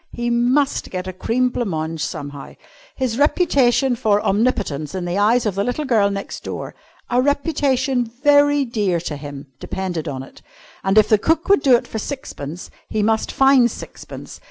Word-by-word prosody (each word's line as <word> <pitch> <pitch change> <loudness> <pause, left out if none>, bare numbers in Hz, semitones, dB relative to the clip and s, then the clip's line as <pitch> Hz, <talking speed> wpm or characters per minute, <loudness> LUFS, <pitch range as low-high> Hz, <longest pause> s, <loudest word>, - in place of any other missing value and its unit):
He 240 0 -2
must 250 +4 +1
get 185 -1 -4
a 185 - -5
cream 250 +7 0
blanc 240 -3 -3
mange 160 -1 -3
somehow. 145 -1 -6 0.4
His 255 -2 -2
reputation 275 -5 +3
for 210 -3 +2
omnipotence 195 - 0
in 180 -2 -3
the 175 +3 -1
eyes 230 +4 +3
of 210 - 0
the 200 +2 -1
little 245 +7 -2
girl 220 -6 +3
next 200 0 -6
door - - -6 0.4
a 245 +1 +3
reputation 275 -3 +1
very 285 +4 +3
dear 205 -7 0
to 160 -3 -4
him 145 -1 -9
depended 180 -4 -4
on 135 -2 -4
it. - - -15 0.4
And 195 +2 +1
if 215 0 +6
cook 325 +2 +1
would 400 - +5
do 260 -3 +5
it 235 - 0
for 220 - -5
sixpence, 180 - -7 0.2
he 215 -1 0
must 220 +1 +1
find 270 -3 +5
sixpence. - - -10
225 Hz, 175 wpm, -20 LUFS, 185-265 Hz, 0.4 s, if